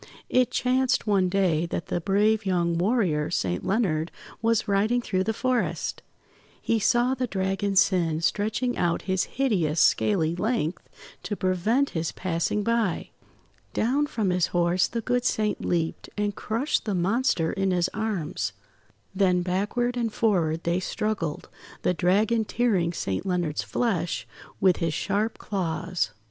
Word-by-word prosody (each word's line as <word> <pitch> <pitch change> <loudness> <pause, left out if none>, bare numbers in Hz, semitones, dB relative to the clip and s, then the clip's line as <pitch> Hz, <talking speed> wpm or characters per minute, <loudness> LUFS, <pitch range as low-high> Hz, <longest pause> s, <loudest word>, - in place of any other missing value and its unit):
It 250 -1 +3
chanced 255 +1 +1
one 195 -4 +2
day 175 -4 +1
that 170 - -3
the 175 - -1
brave 210 +4 +2
young 175 -3 +1
warrior, 175 -5 +1
Saint 90 -1 -1
Leonard, 175 -7 0 0.3
was 230 -1 +1
riding 210 +5 +2
through 190 -5 -1
the 220 - +1
forest. 250 +1 -1 0.6
He 230 - 0
saw 240 +4 +3
the 255 -1 -2
Dragon 195 0 -1
Sin 175 -5 +3
stretching 215 +7 0
out 170 -1 0
his 190 -1 0
hideous 180 - 0
scaly 165 -1 +3
length 185 -4 -2 0.3
to 205 - -3
prevent 205 +9 +1
his 160 -1 -2
passing 185 +3 -1
by. 230 -5 0 0.6
Down 275 +6 +1
from 215 -9 -1
his 180 -1 +2
horse 175 0 +2
the 230 - -3
good 245 +2 0
Saint 215 -3 0
leaped, 165 -2 -1
and 205 -1 -1
crushed 235 +8 -1
the 205 -3 -1
monster 185 -2 +1
in 195 -2 0
his 180 -1 +2
arms. 215 -7 -3 0.6
Then 185 -2 +2
backward 205 +7 -1
and 230 -2 0
forward 170 -8 +1
they 170 +2 +1
struggled, 185 -5 -3 0.4
the - - +2
Dragon 210 +6 +2
tearing 210 -7 +1
Saint 95 - -3
Leonard's 175 -5 -1
flesh 190 -8 -1 0.3
with 185 -2 +4
his 165 -2 -1
sharp 210 +3 -1
claws. 180 -2 -2
195 Hz, 145 wpm, -26 LUFS, 175-225 Hz, 0.6 s, with